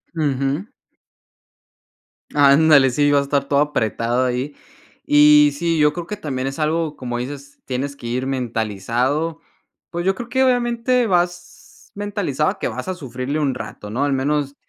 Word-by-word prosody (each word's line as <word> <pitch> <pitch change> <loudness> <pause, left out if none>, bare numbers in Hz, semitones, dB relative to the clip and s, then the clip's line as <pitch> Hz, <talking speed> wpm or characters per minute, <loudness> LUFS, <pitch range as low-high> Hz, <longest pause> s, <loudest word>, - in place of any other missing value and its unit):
Ujú. 145 +3 -1 1.7
Ándale, 145 -1 +6
sí, 145 +3 +2
va 145 - +4
a - - +2
a - - -2
estar 140 0 0
todo 140 0 +2
apretado 120 -3 0
ahí. 130 +3 -2 0.5
Y 150 0 +6
sí, 170 +1 0
yo 150 0 +4
creo 170 +1 -6
que 210 - -5
también 135 -8 -3
es 135 +3 -5
algo 155 0 -1
como 120 -2 -4
dices: 140 +2 -8
"Tienes 135 +2 -3
que 120 - -9
ir 125 +2 -2
mentalizado". 125 - -1 0.5
Pues, 175 0 -4
yo 190 - +3
creo 235 +4 -7
que 260 +2 +1
obviamente 245 -1 +1
vas 175 -2 -3
mentalizado 200 -8 -2
que - - -1
vas - - -6
a - - -1
sufrirle 135 -2 -4
un 140 -4 0
rato, 105 -3 -8
¿no? 120 +6 -1
Al 145 - +1
menos 140 +1 -1
145 Hz, 165 wpm, -20 LUFS, 130-165 Hz, 1.7 s, Ándale